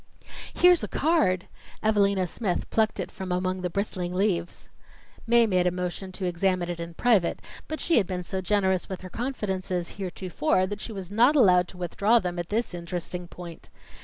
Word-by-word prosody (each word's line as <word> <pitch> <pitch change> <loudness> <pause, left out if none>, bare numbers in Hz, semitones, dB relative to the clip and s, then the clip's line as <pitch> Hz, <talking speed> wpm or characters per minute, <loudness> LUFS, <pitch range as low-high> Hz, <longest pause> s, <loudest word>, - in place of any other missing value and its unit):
"Here's 360 -1 +5
a - - -2
card!" 195 - +1 0.4
Evalina 200 -3 +3
Smith 180 +1 -2
plucked 220 -1 +1
it - - -4
from 190 -1 -6
among 185 +1 -1
the 180 - -1
bristling 180 -1 -3
leaves. 180 -3 -1 0.6
Mae 235 0 +5
made 180 -4 +2
a - - +2
motion 180 +1 -4
to 185 - -4
examine 180 0 0
it 170 - -6
in 170 0 -6
private, 215 -7 +2 0.3
but 315 - -4
she 335 - +2
had 195 - -1
been 180 -1 -3
so 190 +1 -3
generous 190 -1 +1
with 190 -2 -5
her 185 -1 -9
confidences 190 -8 -3
heretofore, 185 - 0
that 205 +2 -5
she - - -6
was 195 -3 -7
not 240 +8 +4
allowed 180 -9 +5
to 180 - -12
withdraw 200 +6 +2
them 180 -5 -2
at 175 - -4
this 225 -1 -1
interesting 175 0 -5
point. 170 -1 -10
185 Hz, 185 wpm, -26 LUFS, 180-210 Hz, 0.6 s, Here's